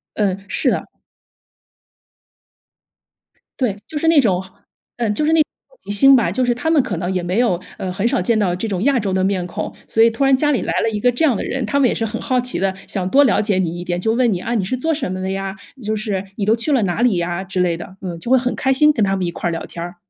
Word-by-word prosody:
嗯， 195 -2 -1
是 - - +1
的。 - - -2 2.7
对， 220 -6 0
就 305 - -6
是 325 - 0
那 325 -3 +6
种 190 -7 +2 0.5
嗯， 225 -3 0
就 300 - 0
是 315 - +2
那 325 - +4
种 - - +5 0.3
好 - - -24
奇 - - -15
心 270 +7 +6
吧， 240 - +2
就 255 - 0
是 245 - +2
他 250 +7 -2
们 310 -4 +4
可 205 -9 -3
能 175 +2 -2
也 180 -1 -1
没 180 +5 -1
有， 205 -8 +2 0.2
呃， 185 - -4
很 195 +4 -3
少 185 - +1
见 220 +4 +1
到 195 -4 +1
这 190 +5 -3
种 195 -1 -2
亚 275 -2 +3
洲 200 -3 -2
的 185 0 +1
面 190 -2 0
孔， 210 +4 -5
所 225 - +3
以 230 - +6
突 230 +5 -1
然 270 -1 +5
家 295 +2 +1
里 270 - +1
来 - - -2
了 225 - +1
一 210 -2 -3
个 245 - +3
这 245 +7 -2
样 270 -8 +4
的 - - -3
人， 265 -3 -2
他 280 +7 0
们 265 - +4
也 - - 0
是 225 - -1
很 225 +1 -4
好 255 -1 +1
奇 250 0 -3
地 190 0 0
想 185 -1 -3
多 285 +6 +5
了 260 - +3
解 205 -3 +1
你 175 -2 -1
一 175 - -5
点， 175 0 -2
就 220 +4 0
问 240 -1 +2
你： 175 - -2
“啊， 240 - -2
你 200 -5 0
是 225 - -1
做 320 +6 -1
什 280 -10 -3
么 185 0 -4
的 190 0 -2
呀？” 195 0 -4 0.3
就 215 0 -2
是 205 -3 -3
“你 200 - -2
都 215 - +4
去 235 +6 -2
了 240 -6 +3
哪 180 +4 -1
里 240 -5 +3
呀” 175 +2 -2
之 185 -1 -2
类 170 -2 +1
的， 180 +2 -10
嗯， 175 -3 -5
就 235 - -6
会 260 - +6
很 250 0 -1
开 265 0 +1
心 300 +3 +5
跟 230 -7 0
他 195 0 0
们 185 -2 -2
一 170 - -2
块 175 - -3
儿 - - -2
聊 165 - -4
天 170 - -9
儿。 175 +1 -7
210 Hz, 315 characters per minute, -19 LUFS, 185-250 Hz, 2.7 s, 那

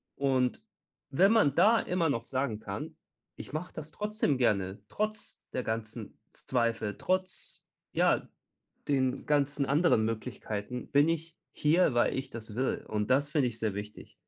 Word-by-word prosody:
und 130 -2 +1 0.5
wenn 185 +9 +5
man 205 -12 +4
da 225 +2 +6
immer 175 -3 0
noch 115 -4 -1
sagen 130 -5 -1
kann: 100 -2 -6 0.4
„Ich - - -9
mache 160 +3 -4
das 155 0 -7
trotzdem 210 -9 0
gerne, 100 -5 +1
trotz 215 0 -3
der 130 - -1
ganzen 110 -1 -4
Z - - -12
Zweifel, 115 -4 +1
trotz 185 0 -1 0.3
ja, - - +3 0.6
den 130 -3 +1
ganzen 145 -1 +2
anderen 145 -6 +3
Möglichkeiten 115 +1 -4
bin 145 +2 +5
ich 165 0 -2 0.2
hier, 155 -2 +3
weil 120 - +3
ich 135 0 -4
das 110 -3 -7
will!“ 130 +1 -1
Und 105 +1 -2
das 140 +3 +3
finde 145 -5 +2
ich 115 -1 -7
sehr 110 -2 0
wichtig. 105 +1 -8
130 Hz, 155 wpm, -30 LUFS, 110-155 Hz, 0.6 s, da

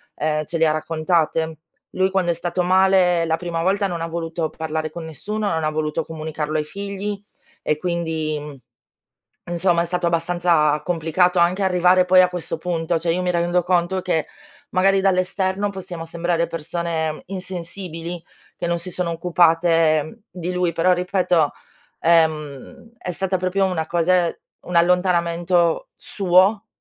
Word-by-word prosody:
ehm, 155 0 -1
ce 165 - -3
le 165 0 +3
ha - - +3
raccontate. 160 0 0 0.3
Lui 190 0 +1
quando 185 -3 +1
è - - +1
stato 175 +2 -2
male 185 -1 +4
la 160 0 0
prima 170 -2 -3
volta 200 +3 +1
non 175 -3 -4
ha 165 - -2
voluto 165 -1 -3
parlare 160 0 -4
con 160 +1 -8
nessuno, 210 +7 -4
non 160 -1 -1
ha 155 - +1
voluto 155 0 -2
comunicarlo 155 -1 -4
ai 155 - 0
figli, 200 +4 -5 0.4
e 150 - 0
quindi, 155 -4 -3 0.9
insomma, 175 0 +1
è - - -3
stato 175 0 -1
abbastanza 170 -3 +2
complicato 175 +2 +1
anche 180 +3 +2
arrivare 180 0 +4
poi 185 0 +6
a 180 - +3
questo 175 -2 -4
punto. 165 0 -1
Cioè, 165 +1 0
io 180 - -1
mi 180 0 0
rendo 175 +1 +1
conto 180 +1 +1
che 170 -4 -1 0.4
magari, 195 +1 +3
dall'esterno, 190 +1 0
possiamo 180 -4 -7
sembrare 170 0 -1
persone 165 -1 -3
insensibili, 175 -2 -6 0.3
che 175 - -4
non 170 0 0
si 180 - -4
sono 175 -1 -2
occupate 165 0 +2
di 180 0 -4
lui, 180 -1 +1
però 180 +3 +3
ripeto, 180 -3 +1 0.5
ehm, 160 - 0
è 180 - -5
stata 190 +2 -1
proprio 185 +2 0
una 165 -4 -2
cose 175 +1 +1 0.2
un 180 - -6
allontanamento 170 -1 +2
suo, 195 +3 +2
170 Hz, 150 wpm, -21 LUFS, 160-185 Hz, 0.9 s, poi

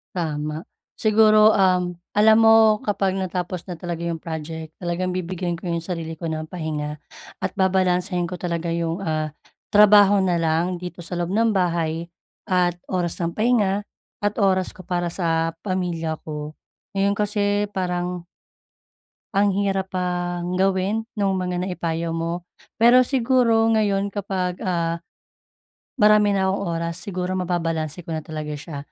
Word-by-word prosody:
Tama. 155 -1 -3 0.3
Siguro, 215 0 +5
um, 180 -2 +2 0.2
alam 220 +1 +6
mo 225 -1 +6
kapag 195 -2 0
natapos 180 -2 -3
na 175 -3 -7
talaga 170 -1 -4
'yung 170 -1 -2
project, 160 0 -6
talagang 180 +1 -2
bibigyan 180 -1 -3
ko 170 +1 -5
'yung 170 - -1
sarili 165 -2 -4
ko 170 - -3
ng 155 -1 -3
pahinga 150 -4 -4 0.4
at - - -2
babalansehin 180 -1 +1
ko 180 - -5
talaga 170 -1 -3
'yung, 165 +1 -1
ah, 155 -4 -2 0.4
trabaho 205 -1 +7
na 185 -2 +2
lang 165 +2 +1
dito 180 0 -8
sa 175 +1 -5
loob 175 0 -2
ng 220 +1 +2
bahay 170 -2 0 0.3
at 180 -2 +1 0.2
oras 175 -3 0
ng 170 - -1
pahinga 210 -2 +1 0.3
at 205 0 -1
oras 190 -2 +1
ko 185 - -11
para 175 0 -1
sa 165 -2 -1
pamilya 175 -5 -2
ko. 150 -1 -6 0.4
Ngayon 200 +1 +1
kasi 205 0 +1
parang 180 -2 -3 1.1
ang 200 -1 +3
hirap 195 -1 -1
pang 175 0 -2
gawin 195 +4 +1
nung 195 -3 +1
mga 180 -1 -2
naipayo 170 -2 -2
mo. 165 +1 -3 0.3
Pero 240 +3 +6
siguro 245 -3 +3
ngayon 200 -2 +1
kapag, 185 -3 -3
ah, 170 -2 -1 1.0
marami 210 -1 +5
na 190 -1 +1
akong 195 +1 -1
oras 170 -1 -2
siguro 185 -1 -3
mababalanse 165 -3 -2
ko 170 - -17
na 155 - -5
talaga 155 -1 -5
siya. 145 0 -8
180 Hz, 145 wpm, -23 LUFS, 170-200 Hz, 1.1 s, trabaho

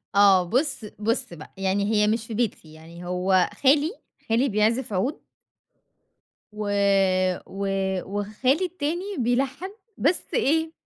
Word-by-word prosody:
آه، 195 -2 +6
بُص 255 - -1
بُص 230 -1 -1
بقى، 155 - -12
يعني 195 +1 0
هي 210 0 +3
مش 225 +1 -1
في 225 - -6
بيتي، 205 -9 -3
يعني 165 +2 -12
هو 180 +1 +2
خالي، 290 +5 +4 0.4
خالي 245 +5 +2
بيعزف 220 +2 +1
عُود. 195 +11 -1 1.3
و 210 -1 -4 0.8
و 195 +1 -4 0.4
وخالي 215 - 0
التاني 355 +3 -3
بيلَحَّن 265 +8 -1 0.3
بس 330 +5 +1
إيه، 320 - +1
225 Hz, 120 wpm, -24 LUFS, 195-280 Hz, 1.3 s, آه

